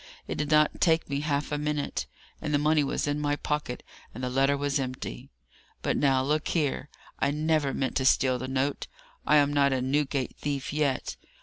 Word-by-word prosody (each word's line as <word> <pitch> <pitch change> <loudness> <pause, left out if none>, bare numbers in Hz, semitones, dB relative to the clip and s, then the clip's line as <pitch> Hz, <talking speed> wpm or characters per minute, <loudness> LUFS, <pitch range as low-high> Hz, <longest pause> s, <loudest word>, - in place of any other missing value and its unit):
It - - -4
did 150 -1 -1
not 150 -1 +3
take 165 -4 +2
me 140 - 0
half 145 -1 -1
a 150 - -1
minute; 150 -1 -2 0.3
and 150 - 0
the - - +5
money 150 +1 +3
was 135 - -1
in 145 0 -1
my 145 0 +1
pocket, 150 -4 -3 0.3
and 125 - -6
the 125 - -1
letter 135 +2 +3
was 145 0 0
empty! 130 - -5 0.5
But - - +1
now, 135 -2 +3
look 150 +3 0
here! 150 -3 -1 0.3
I 140 - +2
never 150 -1 +1
meant 135 -1 -1
to 130 - 0
steal 130 -1 +3
the 130 - -4
note. 130 +2 -1 0.4
I - - +5
am 145 -1 +4
not 140 -1 +3
a 130 - +1
Newgate 135 0 -1
thief, 140 -2 -3
yet. 145 -3 -1
145 Hz, 200 wpm, -28 LUFS, 135-150 Hz, 0.5 s, the